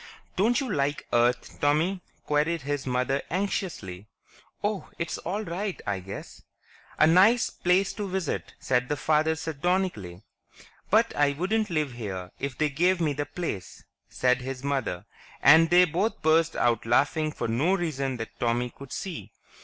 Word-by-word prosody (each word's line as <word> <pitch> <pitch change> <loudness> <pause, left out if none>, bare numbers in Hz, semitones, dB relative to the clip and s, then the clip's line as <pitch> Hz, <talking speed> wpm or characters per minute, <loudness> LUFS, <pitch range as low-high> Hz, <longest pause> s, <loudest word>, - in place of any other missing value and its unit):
"Don't 230 +7 +3
you 275 - -2
like 140 -1 -1
Earth, 120 +1 +1
Tommy?" 160 +6 +2 0.2
queried 150 +1 +1
his 145 -1 -3
mother 125 +2 0
anxiously. 165 - -3 0.6
"Oh... 205 -2 -2
it's 170 - -3
all 200 +5 -3
right, 190 +2 -4
I 100 -2 -1
guess." 95 +2 -9 0.2
"... - - -26
'A - - +6
nice 195 +9 +5
place 185 +2 +1
to 210 -2 -4
visit' 185 -4 -3
..." - - -39
said 125 -1 0
his 145 - 0
father 155 +2 +2
sardonically. 160 - -2 0.3
"... - - -23
'but 225 +3 +3
I 145 -1 +3
wouldn't 210 +8 0
live 155 -5 0
here 95 -6 -6
if 140 -2 -4
they 155 -1 +1
gave 175 +6 +2
me 155 -4 +1
the 145 +1 -3
place!' 130 - -5
..." - - -61
said 125 0 +1
his 130 0 -6
mother, 135 -11 -2 0.3
and 160 +3 +7
they 180 +1 +7
both 185 +7 -1
burst 160 +1 +3
out 120 -2 +1
laughing 155 +6 +2
for - - -3
no 140 +12 +2
reason 140 -7 -2
that 110 -1 -8
Tommy 120 +1 0
could 140 -1 -12
see. 110 - -6
150 Hz, 170 wpm, -27 LUFS, 125-180 Hz, 0.6 s, and